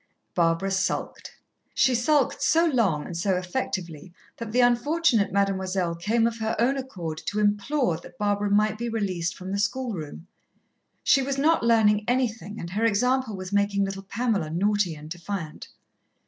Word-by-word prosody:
Barbara 170 +2 +1
sulked. 190 0 -2 0.4
She 260 - +4
sulked 260 +3 +2
so 330 +1 +4
long 220 - +1
and 175 - -7
so 185 +3 +1
effectively 180 - -4 0.3
that 230 -2 -6
the 245 - +1
unfortunate 245 -1 +3
Mademoiselle 190 -3 0
came 215 +7 +1
of 230 0 -1
her 220 0 -1
own 250 +4 +2
accord 180 - -5
to 210 - -1
implore 210 - +1
that 175 +1 -14
Barbara 205 0 0
might 215 +1 +2
be 235 0 -2
released 190 -6 -2
from 185 +1 -7
the 200 - -1
schoolroom. 200 - -3 0.8
She 275 - +4
was 275 +1 -2
not 315 +4 +3
learning 215 -3 +3
anything, 230 -4 -1
and 170 - -6
her 210 +4 -1
example 245 +1 +1
was 185 +1 -7
making 200 0 +2
little 195 0 -5
Pamela 200 -4 -1
naughty 190 +1 +1
and 150 0 -11
defiant. 170 -1 -6
205 Hz, 160 wpm, -25 LUFS, 185-235 Hz, 0.8 s, She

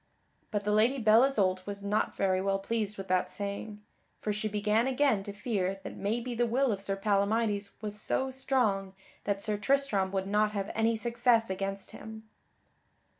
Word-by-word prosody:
But 205 -2 -2
the 210 - 0
Lady 225 +6 +3
Belle 220 -1 +5
Isoult 190 -8 +1
was 200 0 -5
not 205 +2 0
very 185 -1 +1
well 195 0 +1
pleased 210 +1 -2
with 195 -1 -6
that 185 0 +1
saying, 205 +1 -5 0.4
for 210 - -2
she 215 +1 -2
began 210 +3 +1
again 265 -5 +2
to 205 - -6
fear 200 -3 -2
that - - -7
maybe 235 +5 -2
the 240 +1 +1
will 255 +2 +2
of 200 -2 -2
Sir 195 0 -1
Palamydes 205 0 +1
was 210 0 -4
so 265 0 0
strong 225 -8 0 0.3
that 200 -1 -1
Sir 210 -1 0
Tristram 210 -5 +1
would 190 -1 -1
not 210 +1 +1
have 200 -1 -2
any 225 +1 +2
success 235 -1 +2
against 195 +1 -4
him. 220 0 -10
210 Hz, 175 wpm, -30 LUFS, 195-230 Hz, 0.4 s, Belle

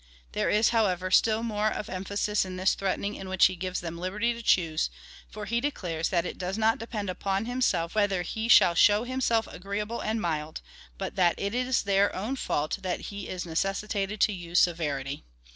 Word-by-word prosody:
There - - 0
is, 215 +2 +4
however, 185 -5 +1
still 220 +3 +4
more 215 -2 0
of 210 - -4
emphasis 200 +2 -1
in 185 -1 -6
this 185 +1 +3
threatening 195 +1 -2
in 195 -2 -7
which 190 -1 +5
he 185 - +2
gives 185 +1 -3
them 170 0 -6
liberty 210 +6 -1
to 235 - -8
choose, 165 - +2 0.4
for 210 0 -7
he 235 +2 0
declares 175 - -2
that 175 -2 +1
it - - -6
does 185 +2 -3
not 225 0 +2
depend 215 -2 -4
upon 195 +3 -1
himself 225 -9 0
whether 205 -4 +1
he 220 +5 -3
shall 180 -7 +7
show 205 +5 +5
himself 245 -3 +1
agreeable 205 +5 -4
and 220 +1 -1
mild, 155 -4 -3 0.4
but - - -5
that 175 -3 +4
it 200 +1 -2
is 250 0 +1
their 200 0 +2
own 220 +8 -2
fault 155 - -2
that 185 -2 -2
he 200 -1 -6
is 180 -1 -4
necessitated 195 +4 -2
to 215 - +4
use 175 -2 0
severity. 145 -5 0
195 Hz, 195 wpm, -28 LUFS, 180-215 Hz, 0.4 s, shall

